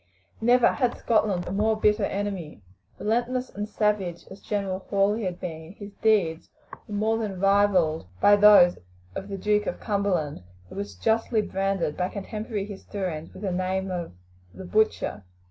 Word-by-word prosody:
Never 240 Hz, +1 st, +5 dB
had 250 Hz, -4 st, 0 dB
Scotland 210 Hz, -6 st, +1 dB
a -, -, -4 dB
more 215 Hz, +2 st, +1 dB
bitter 210 Hz, -1 st, +3 dB
enemy. 190 Hz, -, -4 dB, 0.3 s
Relentless 245 Hz, +3 st, -1 dB
and 205 Hz, +1 st, -5 dB
savage 205 Hz, -5 st, -1 dB
as 190 Hz, -, -11 dB
General 195 Hz, -3 st, -2 dB
Hawley 205 Hz, +2 st, +1 dB
had 180 Hz, -1 st, -3 dB
been, 160 Hz, 0 st, -7 dB
his 205 Hz, -1 st, -10 dB
deeds 190 Hz, -7 st, +2 dB, 0.4 s
were 210 Hz, -, -5 dB
more 220 Hz, +2 st, +1 dB
than 200 Hz, -4 st, -4 dB
rivalled 195 Hz, -, +3 dB
by 205 Hz, -, +6 dB
those 205 Hz, -4 st, +7 dB, 0.3 s
of 190 Hz, -, -6 dB
the 195 Hz, -, -4 dB
Duke 210 Hz, +2 st, +1 dB
of -, -, -3 dB
Cumberland, 190 Hz, -, -1 dB, 0.3 s
who -, -, -11 dB
was 100 Hz, -1 st, -5 dB
justly 220 Hz, -, +1 dB
branded 195 Hz, -5 st, -1 dB
by 180 Hz, 0 st, 0 dB
contemporary 210 Hz, 0 st, -4 dB
historians 190 Hz, -5 st, -5 dB
with 195 Hz, -, -11 dB
the 195 Hz, -, -1 dB
name 185 Hz, +1 st, -1 dB
of 175 Hz, -, -4 dB, 0.4 s
"the 190 Hz, -, -8 dB
butcher." 210 Hz, -, 0 dB
200 Hz, 160 wpm, -26 LUFS, 180-210 Hz, 0.4 s, those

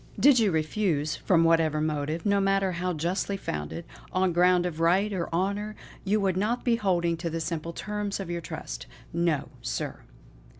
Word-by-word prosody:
Did 280 Hz, -3 st, +7 dB
you 215 Hz, -3 st, +4 dB
refuse, 155 Hz, -2 st, 0 dB
from 170 Hz, -4 st, +3 dB
whatever 165 Hz, -2 st, +3 dB
motive, 155 Hz, +1 st, -1 dB
no 200 Hz, -1 st, +3 dB
matter 195 Hz, -1 st, +2 dB
how 180 Hz, +1 st, -1 dB
justly 180 Hz, +5 st, -1 dB
founded, 75 Hz, -, -4 dB, 0.3 s
on 185 Hz, -1 st, +2 dB
ground 180 Hz, +1 st, +4 dB
of 165 Hz, -3 st, -3 dB
right 190 Hz, +5 st, +3 dB
or 175 Hz, -3 st, -2 dB
honour, 200 Hz, +5 st, -1 dB, 0.3 s
you 205 Hz, +2 st, +2 dB
would 190 Hz, -3 st, +1 dB
not 220 Hz, +5 st, 0 dB
be 240 Hz, -2 st, +4 dB
holding 175 Hz, -5 st, +1 dB
to 170 Hz, +1 st, -3 dB
the 165 Hz, +1 st, -3 dB
simple 165 Hz, 0 st, -3 dB
terms 205 Hz, +3 st, -3 dB
of 195 Hz, -, -4 dB
your 170 Hz, 0 st, -3 dB
trust. -, -, -6 dB, 0.3 s
No! 170 Hz, -3 st, 0 dB
sir. -, -, -3 dB
175 Hz, 175 wpm, -27 LUFS, 165-200 Hz, 0.3 s, Did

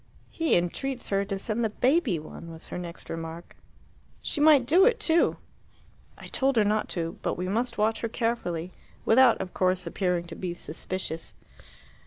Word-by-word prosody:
"He 325 Hz, -1 st, +1 dB
entreats 245 Hz, +9 st, -2 dB
her 195 Hz, 0 st, +2 dB
to 195 Hz, -1 st, -3 dB
send 215 Hz, +4 st, -2 dB
the 220 Hz, -, +1 dB
baby 255 Hz, -, +2 dB
one," 160 Hz, +2 st, -9 dB
was 160 Hz, -1 st, -11 dB
her -, -, -5 dB
next 170 Hz, -1 st, -8 dB
remark. 165 Hz, +1 st, -7 dB, 0.6 s
"She 295 Hz, -, -3 dB
might 295 Hz, -4 st, +6 dB
do 340 Hz, +9 st, +5 dB
it 470 Hz, +2 st, +4 dB
too!" 335 Hz, -5 st, +3 dB, 0.8 s
"I -, -, -11 dB
told 270 Hz, 0 st, +1 dB
her 220 Hz, -, +5 dB
not 210 Hz, +1 st, +1 dB
to; 165 Hz, -1 st, -3 dB
but -, -, -2 dB
we 180 Hz, +1 st, -2 dB
must 230 Hz, +4 st, -1 dB
watch 220 Hz, +1 st, +1 dB
her 230 Hz, -, -2 dB
carefully, 185 Hz, -8 st, -2 dB, 0.3 s
without, 255 Hz, +3 st, +6 dB
of 185 Hz, -, -5 dB
course, 185 Hz, 0 st, +1 dB
appearing 180 Hz, -3 st, 0 dB
to 170 Hz, -1 st, -9 dB
be 175 Hz, -2 st, -4 dB
suspicious." 165 Hz, 0 st, -5 dB
205 Hz, 175 wpm, -27 LUFS, 175-255 Hz, 0.8 s, might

